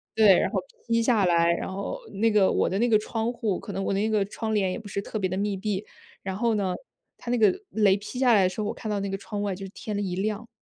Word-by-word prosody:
对， 205 -4 +6
然 - - +1
后 - - 0 0.3
劈 230 0 +2
下 225 -5 +3
来， 170 -1 +4
然 170 - -4
后 200 - -4
那 220 +3 +2
个 205 -3 +4
我 - - +2
的 195 - -1
那 240 - +3
个 220 - +6
窗 225 +2 -2
户， 215 -5 -1
可 200 - -7
能 195 - -2
我 195 - 0
的 195 - 0
那 215 +2 +1
个 215 -2 +2
窗 220 +2 -4
帘 190 -3 +1
也 - - -4
不 220 - -11
是 200 0 -3
特 215 - -5
别 190 -2 0
地 185 - -2
密 200 0 -1
闭， 205 0 -2 0.4
然 190 -1 -3
后 230 0 +1
呢， 190 -3 0 0.4
它 240 - -8
那 245 - +2
个 225 - +4
雷 205 -3 +4
劈 210 +5 -7
下 250 -3 +5
来 200 -3 +5
的 185 - +3
时 185 - -5
候， 210 - -1
我 - - -2
看 220 - -6
到 205 -1 -1
那 200 - -2
个 195 - -2
窗 205 +1 -5
外 200 -1 -1
就 195 +1 -7
是 - - -8
天 215 - -5
的 205 - -1
一 185 -3 -2
亮。 210 +3 -2
205 Hz, 330 characters per minute, -26 LUFS, 195-220 Hz, 0.4 s, 对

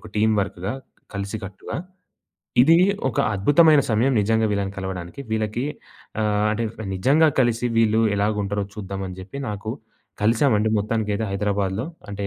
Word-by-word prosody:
ఒక - - -12
టీమ్ 110 +1 +3
వర్క్‌గా 95 +3 -4 0.4
కలిసి 100 +2 -3
కట్టుగా. 95 0 -7 0.9
ఇది 165 +5 +6 0.3
ఒక 125 - -4 0.2
అద్భుతమైన 145 - +5
సమయం 115 +5 +2
నిజంగా 110 +2 +2
వీళ్ళని 100 -1 -1
కలవడానికి 95 +3 -6
వీళ్ళకి 110 +2 -1 0.6
ఆహ్, 105 -1 +1
అంటే, 110 +2 -1 0.3
నిజంగా 140 +12 +4
కలిసి 120 -1 +1
వీళ్ళు 110 0 +3 0.2
ఎలాగుంటారో 100 0 0
చూద్దామని 95 -2 -6
జెప్పి 100 +9 -8
నాకు 105 +1 -4 0.5
కలిసామండి 110 -1 +3
మొత్తానికైతే 105 0 -1
హైదరాబాద్‌లో. 100 +2 -1 0.2
అంటే, 100 0 -4
105 Hz, 125 wpm, -23 LUFS, 100-115 Hz, 0.9 s, ఇది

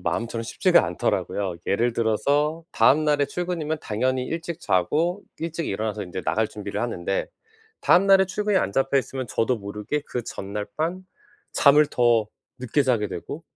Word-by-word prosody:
마음처럼 115 0 -2
쉽지가 - - +3
않더라고요. 95 -4 -1
예를 120 +4 +1
들어서 145 +8 +1
다음날에 150 0 +4
출근이면 165 -3 -3
당연히 125 +4 -1
일찍 165 +3 -5
자고 160 - +1 0.2
일찍 165 0 -3
일어나서 105 +1 -2
인제 90 +1 -5
나갈 110 0 +1
준비를 105 -1 -5
하는데 95 -5 -2 0.5
다음날에 195 +1 +5
출근이 205 +2 0
안 100 - -1
잡혀 135 +1 +2
있으면 130 -1 -4
저도 115 +3 0
모르게 105 +8 -4
그 125 - -3
전날 105 0 -5
밤 170 +4 -2 0.5
잠을 150 +1 +5
더 120 -4 +2 0.3
늦게 130 +3 +1
자게 120 -6 +1
되고 160 +3 -7
130 Hz, 350 characters per minute, -24 LUFS, 105-160 Hz, 0.5 s, 다음날에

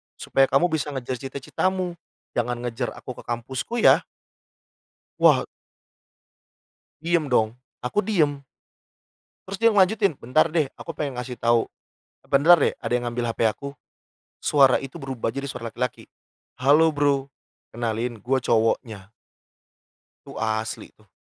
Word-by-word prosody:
supaya 135 0 +2
kamu 145 +6 +2
bisa 150 -2 -2
ngejar 130 -1 -4
cita-citamu. 180 +7 -2 0.4
Jangan 120 0 -1
ngejar 120 +1 -3
aku - - -8
ke - - -10
kampusku, 130 - -3
ya?" - - +6 1.1
Wah - - +5 1.6
Diem 165 -3 +1
dong. 110 -1 +2 0.2
Aku 165 - -1
diem. 150 -9 +1 1.0
Terus 195 0 -5
dia 230 0 +6
ngelanjutin, 200 0 +3
"Bentar 130 +7 +3
deh, 155 -5 +1
aku 165 - -7
pengen 145 -4 -4
ngasih 125 0 -6
tahu. 115 0 +3 0.6
E - - -25
bentar 155 +6 +6
deh, - - +2
ada - - -5
yang 120 0 +1
ngambil 120 0 -2
HP - - -18
aku." 140 +6 -4 0.7
Suara 135 -3 +5
itu 135 +5 -8
berubah, 130 -4 -3
jadi 140 0 -4
suara 115 -3 -6
laki-laki. 125 +3 -4 0.6
"Halo, 150 +5 +5
Bro. 140 -1 +1 0.4
Kenalin, 115 0 -3
gue 130 +2 +1
cowoknya." 110 -3 0 1.1
Itu - - -11
asli 110 0 -3
tuh. 105 -1 -27
135 Hz, 135 wpm, -24 LUFS, 120-155 Hz, 1.6 s, ya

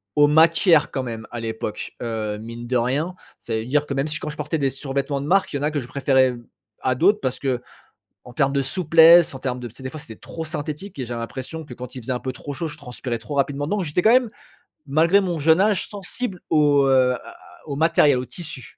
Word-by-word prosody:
aux 145 0 +6
matières 165 +1 +4
quand 130 - -2
même 115 -2 -6
à 120 - -5
l'époque, 110 -1 -5
heu, 110 -3 -3
mine 115 +1 -8
de 125 - +1
rien. 140 +9 -1 0.3
Ça 115 - -5
veut 110 0 -2
dire 145 +3 +1
que - - -3
même 135 +2 0
si 155 0 -3
quand - - -5
je 150 - -8
portais 150 +2 -2
des 140 - +1
survêtements 135 +1 -3
de - - -5
marque, 195 0 +2
il - - 0
y - - -4
en - - -4
a 150 - +1
que 150 - -1
je 120 - -7
préférais, 130 -1 +3
hem, 120 -1 -8 0.4
à 130 0 +1
d'autres 200 +9 +3
parce 130 -1 -2
qu'en 125 -3 -4 0.5
termes 135 +2 +1
de 140 - +2
souplesse, 165 +1 +6
en - - -6
termes 130 -1 -3
de 120 - -6
tu 115 - -19
sais? 130 - -12
Des 130 - -5
fois 155 - -8
c'était 115 -6 -10
trop 165 +8 -7
synthétique 155 +3 -5
et 130 - -2
j'avais 120 0 -5
l'impression 130 +7 -6
que 130 - -10
quand 125 +1 -9
il 130 - -6
faisait 130 +3 -3
un 125 - -2
peu 130 - -4
trop 145 +2 -7
chaud, 165 - -3
je 155 - -8
transpirais 125 -3 -5
trop 140 +6 -7
rapidement 140 +1 0
dedans. 205 +7 -1
Donc 190 - -1
j'étais 150 +3 0
quand 220 +4 +6
même, 250 -3 +4 0.6
malgré 165 +7 +4
mon 175 -5 -2
jeune 160 +4 +4
âge, 205 -1 +2
sensible 200 0 -5
aux, 145 -3 +4
heu, 130 -1 +4
à - - -2
à - - -13 0.3
aux 140 - -3
matériels, 155 -4 +4
aux 125 - -3
tissus. 160 -8 -6
140 Hz, 260 wpm, -22 LUFS, 125-160 Hz, 0.6 s, aux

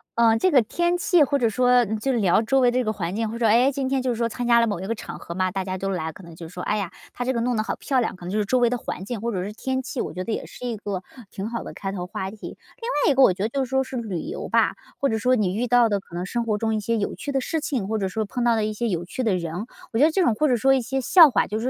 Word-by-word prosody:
呃， 225 -1 +4
这 370 - +3
个 270 -7 +5
天 345 +10 0
气， 350 -3 +4
或 280 +1 +1
者 235 -4 +2
说 250 +2 +4
就 265 +5 -1
聊 205 -5 +3
周 265 +4 +2
围 245 - +4
的 245 - -1
这 - - +1
个 215 - 0
环 175 -3 -3
境， 225 +1 -1
或 230 - -5
者 235 - 0
说， 220 - +5
哎， 245 +4 +5
今 270 -1 -2
天 270 -1 +1
就 255 -1 0
是 - - -1
说 230 0 0
参 245 +1 -4
加 235 -1 +5
了 230 - +2
某 205 -5 -2
一 190 - -5
个 230 - 0
场 - - -8
合 170 - -7
嘛， 185 0 0
大 190 0 -3
家 185 -1 -3
都 195 +1 -3
来， 160 -4 -3
可 - - -13
能 170 - -12
就 165 - -8
是 165 - -14
说， 180 - -6
哎 210 - 0
呀， 195 -4 -2 0.2
他 245 - -4
这 260 - 0
个 235 - -1
弄 245 0 0
得 215 - +1
好 - - -3
漂 265 -3 0
亮， 225 - -1
可 180 - -14
能 180 - -4
就 215 - -1
是 210 - +1
周 255 +5 +2
围 240 -1 +4
的 250 - -1
环 190 - -6
境 235 0 -4
或 235 +3 -2
者 185 -2 -2
是 205 - -5
天 260 +3 -2
气， 260 0 -6
我 - - -3
觉 185 - -4
得 225 - -4
也 - - -3
是 250 - -10
一 230 - -3
个 200 -3 -4 0.3
挺 200 +3 -5
好 235 - -4
的 - - -8
开 195 -1 -5
头 180 -2 -4
话 190 +1 -4
题。 220 - -12
另 475 - -9 0.2
外 295 - +5
一 - - +3
个 270 - +4
我 185 - +6
觉 190 - -8
得 220 - 0
就 270 +1 -1
是 - - -13
说 265 0 +2
是 260 0 -6
旅 210 -8 -3
游 410 - -5
吧， - - +2 0.2
或 275 - +2
者 220 - 0
说 250 +3 +2
你 200 -6 0
遇 240 - 0
到 240 -1 +4
的 205 -1 +1
可 185 - -20
能 175 +1 -3
生 235 +2 -2
活 215 -2 0
中 220 0 0
一 - - 0
些 230 +3 -1
有 205 - -2
趣 285 - -5
的 270 - +1
事 320 +5 -2
情， 260 -9 -2
或 220 - 0
者 195 -2 -1
说 215 +4 -2
碰 245 +4 -3
到 235 -1 +4
的 220 - 0
一 215 - -1
些 230 +3 -2
有 175 -3 -1
趣 220 - -5
的 215 -5 +2
人， 175 +3 -4 0.3
我 225 - -2
觉 295 - +7
得 320 - +3
这 375 +2 +2
种 235 - +3
或 305 - +2
者 250 - +3
说 270 +4 +3
一 260 - +1
些 265 +3 -2
笑 325 +4 +7
话， - - +2
就 215 - -3
是 230 - -4
230 Hz, 390 characters per minute, -24 LUFS, 200-255 Hz, 0.3 s, 觉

